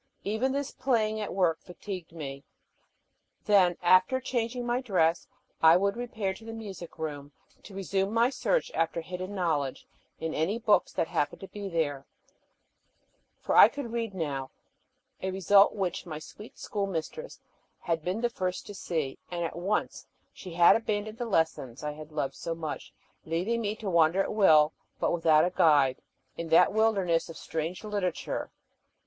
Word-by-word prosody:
Even 220 +6 0
this 280 0 -2
playing 220 -4 0
at 210 - -4
work 175 -4 +1
fatigued 180 -1 -8
me. 140 -4 -7 1.0
Then, 185 -4 +4
after 185 +8 +5
changing 245 -1 -2
my 240 +1 0
dress, 175 -9 +1 0.3
I 160 +1 +8
would 200 +2 +1
repair 220 -5 -3
to 220 - -14
the 225 0 -7
music 200 -6 -8
room 145 -3 -5 0.3
to 195 - -12
resume 195 0 -1
my 230 +3 +3
search - - 0
after 165 +1 0
hidden 185 +4 -6
knowledge 155 -7 -1 0.3
in 160 0 -3
any 170 +8 0
books 220 -3 +2
that 165 - 0
happened 145 - -1
to 195 - -7
be 200 0 -6
there; 145 -5 -2 1.3
for - - -1
I - - +10
could 280 -5 -6
read 230 -4 -3
now, 140 -6 -3 0.7
a 190 - -2
result 195 +2 +4
which 190 -2 -2
my 155 -2 -5
sweet 210 +7 -12
schoolmistress 200 - -4 0.4
had 165 -2 -1
been 185 +6 -2
the 240 - +1
first 185 -4 -3
to 205 - -8
see, 160 -8 -3
and 175 -1 -2
at - - -5
once 190 +5 -2 0.3
she 180 -3 -9
had 170 0 +7
abandoned 215 -1 -2
the 240 - -2
lessons 160 - -1
I 150 - -2
had 155 +1 -10
loved 150 -3 -2
so 165 - -4
much, 160 -2 -6 0.3
leaving 185 +9 -1
me 210 -1 -2
to 215 -1 -7
wander 170 +1 +4
at - - -4
will, 155 -7 +5 0.3
but - - +1
without 160 -2 +4
a 180 - -1
guide, 145 -7 +4 0.4
in 170 -1 -5
that 165 - +5
wilderness 195 -7 +2
of 165 - -8
a - - -10
strange 165 +4 -4
literature. 205 -5 -3
185 Hz, 165 wpm, -29 LUFS, 160-215 Hz, 1.3 s, I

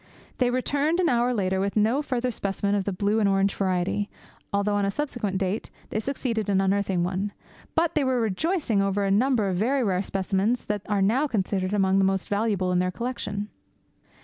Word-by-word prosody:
They 250 -1 +3
returned 285 +6 0
an 355 - +3
hour 245 0 +2
later 190 -5 0
with 200 +1 -1
no 225 +7 +3
further 255 -3 -1
specimen 200 -1 -1
of 200 -2 0
the 200 - -1
blue 205 +3 +1
and 205 -2 +3
orange 195 0 +2
variety, 190 +2 0 0.4
although 200 +1 +1
on 205 0 +1
a 195 - +1
subsequent 225 -6 -2
date 190 +2 -2 0.2
they 215 - 0
succeeded 230 -4 -2
in 195 -1 +3
unearthing 195 -2 +1
one, 190 +3 -2 0.4
but 335 0 +2
they 300 - +2
were 260 -2 +1
rejoicing 230 - 0
over 195 +1 0
a 195 - +1
number 225 0 +3
of 185 -2 -1
very 255 +7 +1
rare 190 -4 +1
specimens 195 +4 -1
that 210 -1 -2
are 200 -2 +2
now 250 +9 +2
considered 190 -5 -1
among 195 -1 +3
the - - +4
most 190 -1 0
valuable 200 -3 0
in 180 - +2
their 180 0 +1
collection. 210 -1 -4
205 Hz, 200 wpm, -26 LUFS, 195-245 Hz, 0.4 s, the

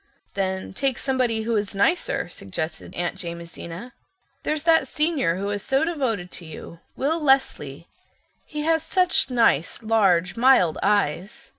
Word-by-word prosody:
"Then 190 -1 -2
take 265 +4 0
somebody 250 -5 0
who 230 +1 -1
is 205 -2 -2
nicer" 275 - +1
suggested 155 - -6
Aunt 175 - -2
Jamesina. 170 +5 -7 0.5
"There's 305 -1 -2
that 330 -1 +4
Senior 300 - +1
who 200 +1 -3
is 205 -1 -2
so 270 +6 +1
devoted 250 - -2
to 175 - -8
you—Will 265 - -4
Leslie. 220 - +1 0.6
He 300 - -6
has 320 +1 +2
such 360 +1 +2
nice, 230 - +2
large, 195 -5 +2
mild 230 -10 +4
eyes." 200 -1 0
220 Hz, 135 wpm, -24 LUFS, 175-275 Hz, 0.6 s, that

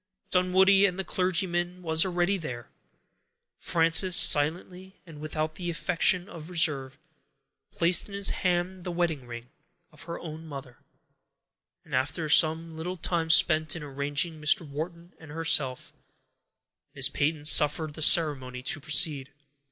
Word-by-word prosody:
Dunwoodie 190 +2 +3
and 180 -1 -5
the 190 - -3
clergyman 180 -1 -2
were 160 -1 -4
already 180 +1 0
there. 125 -10 -8 0.9
Frances, 165 +2 +1
silently, 180 +6 +1
and 160 -4 -13
without 155 0 -4
the 175 +1 -6
affectation 175 +2 -1
of 160 0 -11
reserve, 145 -6 +1 0.7
placed 170 +3 +1
in 200 - -8
his 200 0 +3
hand 180 0 -2
the 180 - -6
wedding 165 -7 -3
ring 120 +1 -10 0.4
of 150 - -17
her 170 0 -7
own 160 0 -9
mother, 135 -4 -10 1.1
and - - -14
after 150 +5 -1
some 160 +1 +2
little 175 +3 -6
time 165 -1 -2
spent 155 -1 +3
in 165 - -7
arranging 145 +3 -4
Mr. 155 +1 +2
Wharton 170 +4 -8
and 160 - -14
herself, 150 -5 0 1.0
Miss 135 -1 +3
Peyton 150 +1 -2
suffered 150 +1 +4
the 155 - -10
ceremony 135 -6 +3
to 140 - -1
proceed. 150 -1 +1
160 Hz, 135 wpm, -26 LUFS, 150-175 Hz, 1.1 s, suffered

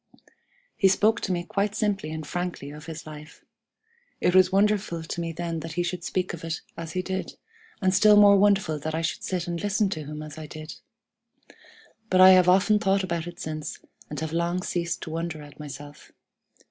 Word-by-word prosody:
"He 195 - +4
spoke 215 +4 +3
to 195 - -2
me 175 -1 -1
quite 200 +3 -1
simply 200 -7 -1
and 155 -1 -5
frankly 175 -4 -4
of 150 +2 -11
his 160 -1 -7
life. 150 0 -11 0.7
It 180 - +2
was 185 0 +6
wonderful 195 -4 +1
to 170 +1 -4
me 165 0 -3
then 165 0 -4
that 160 +1 -7
he 175 +1 0
should 175 0 -4
speak 180 +1 -2
of 165 - -8
it 165 -1 -3
as 165 -1 -7
he 185 - -1
did, 190 0 -4 0.5
and 185 0 +3
still 210 +2 +6
more 205 -1 +8
wonderful 195 -6 +3
that 155 +2 -3
I 165 - -2
should 160 - -2
sit 180 -2 -2
and 170 -1 -4
listen 205 0 +1
to 155 -5 -4
him 150 +1 -6
as 155 0 -9
I 155 - -7
did. 155 +1 -8 1.4
But 185 - +3
I 185 0 +10
have 185 -1 +6
often 195 +3 +4
thought 195 -1 +2
about 170 -2 -3
it 175 +1 -9
since, 155 -4 -5 0.3
and 150 - -5
have 160 0 -4
long 170 +2 0
ceased 170 -2 -2
to 160 - -7
wonder 165 -2 -4
at 145 0 -14
myself. 145 0 -10
170 Hz, 205 wpm, -26 LUFS, 155-190 Hz, 1.4 s, I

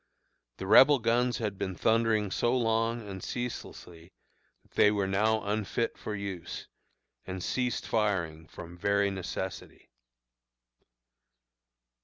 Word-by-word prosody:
The 95 - -6
Rebel 135 +8 +7
guns 120 +1 +1
had 105 -4 -3
been 95 -1 -3
thundering 110 -1 +2
so 120 +6 +1
long 115 -1 0
and 95 -2 -7
ceaselessly 90 -8 -6 0.5
that - - -30
they - - +5
were 100 -2 0
now 110 +3 +1
unfit 105 +3 -1
for 105 - -5
use, 100 -4 -6 0.6
and 95 -1 -5
ceased 125 -2 -1
firing 85 -8 -1
from 85 +1 -11
very 100 +1 +2
necessity. 95 -4 -6
105 Hz, 115 wpm, -29 LUFS, 95-115 Hz, 0.6 s, Rebel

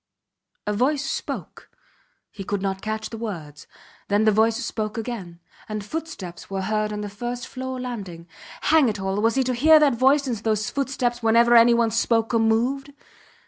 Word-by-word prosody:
A 210 - -1
voice 275 +6 +1
spoke. - - -5 0.6
He 195 - -8
could 200 0 -3
not 195 -1 -2
catch 215 0 -4
the 225 - -6
words. 160 -10 -7 0.4
Then 205 +1 +2
the 215 - +5
voice 220 +2 +3
spoke 215 0 -3
again, 215 -7 -6 0.3
and 215 -1 -4
footsteps 255 - -7
were 195 -1 -3
heard 215 +1 -1
on 210 0 -4
the 205 - -4
first 240 +4 -5
floor 260 0 -5
landing. 195 -9 -6 0.3
Hang 310 -5 +4
it 210 -1 -4
all! 195 +1 -1
Was 225 +2 +2
he 265 - +2
to 255 0 -1
hear 310 +6 +6
that 295 -3 +4
voice 270 +4 +3
and 245 -4 -2
those 215 0 -1
footsteps 260 -3 -1
whenever 235 +1 +4
any 235 0 +7
one 230 -1 +2
spoke 225 0 +1
or 230 - +3
moved? 245 +6 +1
225 Hz, 185 wpm, -23 LUFS, 210-250 Hz, 0.6 s, any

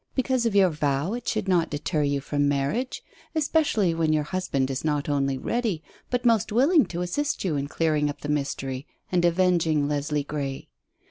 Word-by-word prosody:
Because 260 -2 +1
of 215 - -2
your 190 -3 +5
vow 145 +4 0
it 245 - -5
should 215 -3 -1
not 175 -3 +2
deter 150 +2 -1
you 140 -1 0
from 145 0 0
marriage, 145 - -1 0.3
especially 290 - +2
when 165 -1 +1
your 155 -1 +2
husband 145 -6 -1
is 130 - -3
not 150 -2 0
only 140 -2 0
ready, 215 - -1 0.3
but 245 0 -1
most 225 -5 +3
willing 275 - +4
to 175 0 -3
assist 290 +12 -1
you 175 -6 0
in 140 0 -2
clearing 155 -1 +1
up 145 - -7
the - - -5
mystery, 140 -2 -2 0.2
and 180 -1 +2
avenging 170 -4 +2
Leslie 145 0 -1
Grey. 140 -2 -5
160 Hz, 185 wpm, -25 LUFS, 145-205 Hz, 0.3 s, your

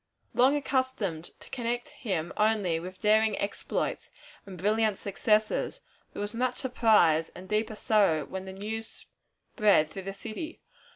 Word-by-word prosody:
Long 260 +4 +5
accustomed 260 - -1 0.2
to - - -10
connect 240 -1 -2
him 175 -7 -3
only 210 -6 +2
with 185 +2 -8
daring 215 +1 +3
exploits 200 - -2 0.4
and 190 -2 -8
brilliant 215 +2 +2
successes, 210 +2 0 0.3
there - - -7
was 205 - -5
much 250 +2 0
surprise 210 -11 +3
and 185 +1 -10
deeper 215 +1 0
sorrow 200 -9 +2
when 190 0 -6
the 190 - -7
news 220 +3 -6 0.5
spread 195 -8 +4
through 195 - -6
the - - -5
city. 225 +11 -7
210 Hz, 140 wpm, -29 LUFS, 190-225 Hz, 0.5 s, Long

